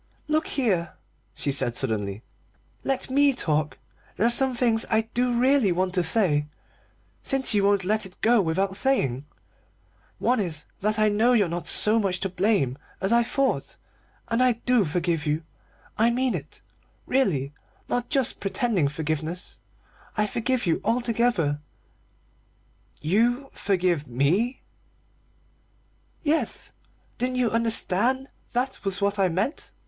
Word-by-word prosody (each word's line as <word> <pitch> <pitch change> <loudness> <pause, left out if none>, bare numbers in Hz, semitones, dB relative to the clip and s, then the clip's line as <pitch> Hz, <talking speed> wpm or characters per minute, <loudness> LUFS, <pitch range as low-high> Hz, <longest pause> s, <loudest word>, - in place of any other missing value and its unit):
"Look 310 +1 0
here," 190 - 0 0.4
she 140 - -1
said 120 -3 0
suddenly, 105 -4 -3 0.6
"let 270 -1 -2
me 280 +1 +4
talk. 155 - 0 0.4
There 215 - +2
are 235 - +4
some 260 +1 +3
things 235 -2 +2
I 220 0 +3
do 245 -1 +1
really 260 -5 +3
want 185 +1 0
to 185 - +2
say, 160 -5 +1 0.7
since 270 -3 +1
you 205 -1 +2
won't 200 -1 +2
let 215 +3 +1
it 185 - -15
go 230 0 +4
without 190 +3 -1
saying. 145 - 0 0.9
One 245 0 +1
is 160 -7 -3
that 215 +2 0
I 215 0 +4
know 210 +3 +2
now 250 - +5
you're 210 -6 +3
not 175 +1 -4
so 215 +2 +5
much 190 -4 -1
to 195 - -1
blame 180 - 0 0.2
as 195 +2 -1
I 235 - +5
thought, 265 +3 -1 0.5
and 230 +1 +1
I 255 -1 +4
do 235 -2 +1
forgive 165 -1 -1
you. 150 +2 0 0.6
I 230 +2 +5
mean 250 +1 0
it, - - -7 0.4
really, 150 - 0 0.3
not 245 0 -2
just 270 -4 +1
pretending 195 - 0
forgiveness; 155 +3 -4 0.6
I 210 - +3
forgive 240 +4 -1
you 170 - +1
altogether 230 -10 +1 0.7
" - - -38
"You 245 +6 +1
forgive 180 -6 0
me?" 170 - 0 1.6
"Yes, 315 +1 -1 0.5
didn't 255 +1 -1
you 250 -3 +1
understand 230 +3 +1 0.2
that 255 +2 0
that - - -15
was 195 -1 -2
what 200 0 0
I 190 -2 +3
meant? 195 - -3
210 Hz, 145 wpm, -25 LUFS, 170-245 Hz, 1.6 s, now